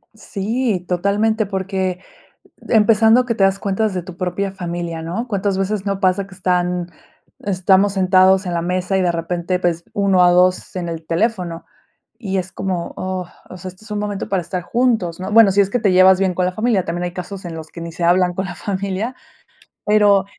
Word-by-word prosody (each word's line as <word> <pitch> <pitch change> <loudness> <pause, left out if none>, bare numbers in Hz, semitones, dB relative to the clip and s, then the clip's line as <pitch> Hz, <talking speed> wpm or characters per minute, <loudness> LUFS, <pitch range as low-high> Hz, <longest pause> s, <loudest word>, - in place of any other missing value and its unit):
Sí, 215 -1 -2
totalmente, 205 +4 +1
porque 190 -1 -2 0.7
empezando 225 +2 +5
que 235 -2 -1
te 195 - +2
das 195 0 +2
cuenta 200 +2 -1
desde 190 -4 -1
tu 175 0 -10
propia 185 +2 -2
familia, 170 -3 -5
¿no? 180 +10 -4
Cuántas 200 -2 -1
veces 195 +1 -2
no 195 -1 -1
pasa 190 0 +1
que 195 - -14
están 180 -1 -1 0.5
estamos 195 0 +2
sentados 190 0 +4
en 175 - -2
la 170 - -1
mesa 185 +2 -1
y 190 - +2
de 175 -1 +1
repente, 175 +2 -2
pues, 170 -1 -1
1 195 -3 +3
a 175 - +6
2 180 +1 +2
en 175 -2 -3
el 165 -1 -6
teléfono. 175 -2 -1 0.5
Y 195 -4 -2
es 185 0 -4
como: 185 -3 -3
"Oh, 185 -1 -4 0.2
o 185 - -8
sea, 185 +1 -7
este 185 +4 -13
es 220 - -15
un 210 - -2
momento 205 -1 -3
para 195 -2 0
estar 180 +1 -4
juntos", 220 -7 0
¿no? 190 +2 -4
Bueno, 225 -3 +7
si 200 - +3
es 195 - +3
que 245 - +1
te 210 -5 +2
llevas 185 0 +6
bien 190 -2 +1
con 180 0 0
la 185 - -1
familia, 215 -1 +1
también 175 +1 -3
hay 175 - -3
casos 190 +2 -7
en 165 -2 -6 0.2
que 170 - -9
ni 170 - -6
se 170 +1 -4
hablan 180 +1 +3
con 190 +1 -2
la 175 - -6
familia, 200 +6 -3 0.7
pero 205 -2 +4
190 Hz, 205 wpm, -19 LUFS, 180-200 Hz, 0.7 s, Bueno